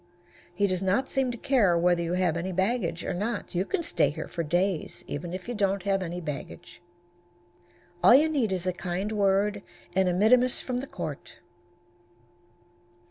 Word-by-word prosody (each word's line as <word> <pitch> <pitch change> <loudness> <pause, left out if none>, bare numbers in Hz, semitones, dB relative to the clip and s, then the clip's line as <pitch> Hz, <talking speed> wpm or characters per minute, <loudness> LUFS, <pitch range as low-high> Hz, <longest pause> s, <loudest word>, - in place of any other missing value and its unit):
He 200 +2 +2
does 185 -2 0
not 195 +8 +1
seem 265 -1 0
to 240 - -4
care 220 -10 +3
whether 175 0 +2
you 170 +1 -2
have 180 -3 +1
any 175 +3 -3
baggage 190 -2 -1
or - - -2
not. 210 +6 -3
You 180 +2 0
can 365 - -2
stay 165 - +2
here 155 +2 -6
for 170 - -4
days, 175 +2 -1
even 170 +4 -5
if 185 +2 -6
you 245 - -3
don't 200 -3 0
have 195 -1 +1
any 175 0 -4
baggage. 150 -4 -8 1.2
All 240 - +8
you 300 +4 +5
need 270 -10 0
is 185 -1 -2
a 185 - 0
kind 185 +3 -3
word 205 0 +1 0.3
and 190 -1 +3
a - - 0
mittimus 245 +6 +4
from 250 -1 -3
the 265 +3 -4
court. 150 - -7
190 Hz, 180 wpm, -27 LUFS, 175-220 Hz, 1.2 s, All